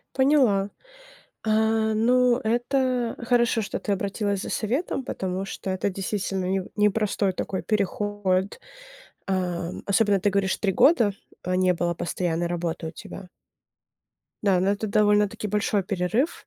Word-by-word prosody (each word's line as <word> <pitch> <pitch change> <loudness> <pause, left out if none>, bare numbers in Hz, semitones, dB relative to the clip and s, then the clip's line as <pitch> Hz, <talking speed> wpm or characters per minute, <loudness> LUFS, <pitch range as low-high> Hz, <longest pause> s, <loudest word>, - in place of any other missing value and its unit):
Поняла. 260 -8 +3 0.7
А, 220 0 +2
ну, 245 +2 +3
это 245 +1 0
хорошо, 235 -2 +3
что 205 - -4
ты 210 - -3
обратилась 200 0 -2
за - - -5
советом, 265 - -1
потому 190 -4 -3
что 195 - -6
это 190 +2 0
действительно 195 0 -3
неу 190 0 -1
непростой 210 -2 +1
такой 185 +1 -3
переход. 205 -2 -1 0.7
Ам, 180 -2 -2
особенно 200 -1 +3
ты 205 - +2
говоришь, 195 -1 +1
3 195 -2 0
года, 235 - +4 0.3
э, 180 - -1
не 185 0 +3
было 175 0 -1
постоянной 170 0 -2
работы 170 -1 -3
у - - -5
тебя. 180 +3 -10 1.1
Да, 195 -3 +3
ну, 190 - +1
это 205 +2 -1
довольно-таки 210 0 +2
большой 205 0 +1
перерыв, 195 - -1
200 Hz, 135 wpm, -25 LUFS, 185-220 Hz, 1.1 s, года